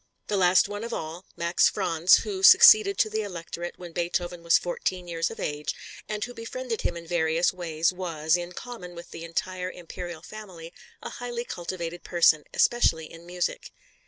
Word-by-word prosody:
The 210 - 0
last 185 -1 +4
one 205 +1 -6
of 235 0 -5
all, 165 +2 -6
Max 170 +1 +3
Franz, 175 -3 +3
who 390 -3 -4
succeeded 395 0 +8
to 220 - +3
the 220 0 -1
Electorate 175 -3 -6
when 175 -1 -9
Beethoven 175 +1 -2
was 170 0 +4
fourteen 180 0 -3
years 165 -1 -1
of - - -10
age, 150 0 -3 0.3
and 210 -1 -3
who 245 - -6
befriended 230 0 -5
him - - -2
in 170 - -9
various 165 0 +1
ways 165 -1 -1
was, 165 -3 0
in 175 0 -4
common 180 -6 -9
with 170 0 -11
the 165 - -8
entire 180 +2 -3
Imperial 175 -2 -8
family, 180 -7 -10 0.3
a - - -5
highly 240 -1 -5
cultivated 175 -2 -6
person, 165 -3 +3
especially 160 -10 +2
in 165 +1 -13
music. 180 0 -3
175 Hz, 175 wpm, -26 LUFS, 170-205 Hz, 0.3 s, succeeded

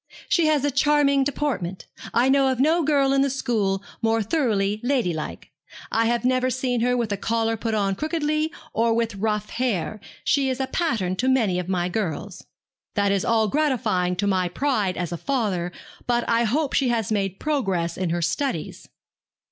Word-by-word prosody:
'She 335 -3 +3
has 300 -2 +2
a 290 - +1
charming 280 0 +3
deportment. 260 -10 -2 0.3
I 240 +2 +3
know 270 0 +4
of 260 -2 0
no 320 +5 +3
girl 280 -2 +3
in 275 - +3
the 275 - +2
school 210 -7 -1 0.2
more 225 0 +2
thoroughly 210 -6 0
ladylike. 230 - -2 0.4
I 225 +1 +2
have 235 0 0
never 255 0 +2
seen 250 -2 -1
her 250 +1 +2
with 230 -3 -1
a 200 - 0
collar 225 +2 0
put 225 0 -2
on 200 -2 +1
crookedly, 310 - -1 0.2
or 230 0 +2
with 230 -1 0
rough 210 +1 -2
hair. 215 -4 -1 0.2
She 275 -1 +2
is 260 0 -2
a 265 - +1
pattern 220 - -1
to 255 +5 +1
many 220 -9 +2
of 180 0 -5
my 180 -2 0
girls.' 185 -1 -4 0.5
'That 200 -1 +2
is 195 -1 +1
all 220 -1 +2
gratifying 220 -10 +1
to 200 - -1
my 185 -3 +1
pride 210 -5 0
as 175 -2 -3
a 170 - -3
father; 200 - -1 0.4
but 240 -1 +1
I 230 0 +2
hope 280 +6 0
she 265 -3 +2
has 225 -3 0
made 195 -3 -1
progress 195 - -1
in 185 -2 -2
her 170 +1 -1
studies.' 260 - -2
230 Hz, 185 wpm, -24 LUFS, 195-270 Hz, 0.5 s, know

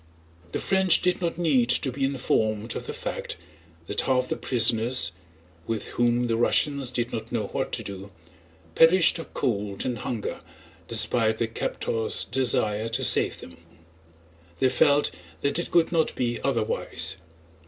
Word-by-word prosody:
The - - -2
French 190 -3 +3
did 180 0 +1
not 170 -2 -2
need 140 -9 +2
to 130 +1 +1
be 135 +2 -4
informed 115 -4 -1
of - - -6
the - - -3
fact - - -5 0.5
that 105 - -1
half 130 -1 +1
the - - -1
prisoners—with 105 -6 -1
whom 120 0 +1
the 115 -1 0
Russians 140 +2 +1
did 120 -1 -3
not 110 0 -5
know 110 -4 -2
what - - -3
to - - -2
do—perished 90 - 0
of 165 - -9
cold 105 -6 -2
and 125 -3 -2
hunger 110 -1 -4 0.5
despite 110 0 +2
their 115 - 0
captors' 115 0 0
desire 115 -3 0
to 125 +4 -2
save - - +3
them; - - -12 1.0
they 130 - +3
felt 145 +2 +3 0.3
that 140 +4 0
it 170 - -3
could 170 -1 +3
not 165 -2 +1
be 120 -1 -2
otherwise. 95 +1 0
120 Hz, 145 wpm, -25 LUFS, 105-135 Hz, 1.0 s, French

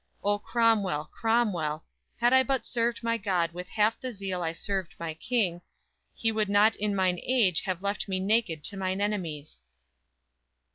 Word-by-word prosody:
O, 205 0 +1
Cromwell, 205 -10 +1
Cromwell, 195 -10 0 0.3
Had 240 +2 +4
I 260 - +7
but 265 0 -1
served 235 -1 -1
my 230 0 +1
God 180 -5 0
with 180 +1 -8
half 215 +1 +1
the 255 - -3
zeal 195 -4 -4
I 165 -1 -1
served 190 +1 -3
my 165 -1 -4
King, 180 -1 0 0.5
he 225 - 0
would 215 -2 0
not 210 +2 +5
in 205 -1 -1
mine 185 -2 +1
age 225 -10 +2
Have 185 -1 -3
left 200 +1 -1
me 190 -1 -1
naked 190 -6 +1
to 200 - -3
mine 190 0 -1
enemies!" 170 - -3
200 Hz, 170 wpm, -28 LUFS, 180-225 Hz, 0.5 s, I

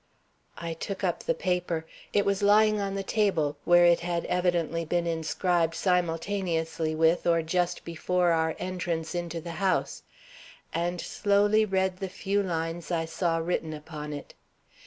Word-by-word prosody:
I 170 -1 -4
took 195 +4 -5
up - - 0
the - - 0
paper. 180 - -1 0.3
It 205 - +2
was 200 0 +1
lying 215 +1 +5
on 195 0 -2
the 195 - -2
table, 180 -9 +1
where 175 0 +6
it 170 -1 +5
had 170 0 -2
evidently 175 -2 0
been 170 +1 0
inscribed 165 0 0
simultaneously 165 -2 0
with 165 +2 +3
or 165 -1 +3
just 175 +2 -1
before 175 +1 +1
our 160 -1 +1
entrance 175 -3 -3
into 175 -1 -3
the 170 +1 -7
house, 190 -1 0 0.7
and 175 +1 -1
slowly 205 +3 +2
read 190 -2 0
the 190 0 -4
few 200 +2 -1
lines 165 -2 -3
I 165 -2 0
saw 165 0 0
written 165 -1 -2
upon 150 0 -7
it. 145 -1 -7
175 Hz, 155 wpm, -28 LUFS, 165-190 Hz, 0.7 s, where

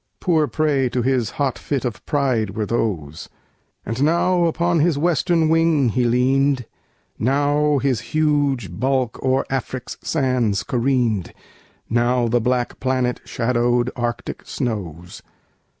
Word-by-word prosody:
Poor 160 -5 +2
prey 145 -5 +1
to 125 0 -1
his 125 -4 +1
hot 140 -4 -1
fit 140 -3 -2
of 115 -3 -4
pride 125 -9 0
were 110 - 0
those. 90 -10 -3 0.6
5 115 +2 -3
And 135 - +1
now 175 +2 +2
upon 170 +1 +1
his 155 -1 +2
western 165 +1 +2
wing 160 -5 +3
he 125 +2 0
lean'd, 130 +2 +2 0.5
Now 145 +3 +2
his 130 -4 0
huge 145 - 0
bulk 130 -1 0
o'er 130 0 +1
Afric's 130 -1 -4
sands 125 -9 0
careen'd, 120 -7 0 0.5
Now 120 +1 +1
the 120 +1 +1
black 125 +1 -1
planet 130 -1 0
shadow'd 120 +1 0
Arctic 120 -5 -4
snows. 90 -8 -5
130 Hz, 130 wpm, -21 LUFS, 120-145 Hz, 0.6 s, wing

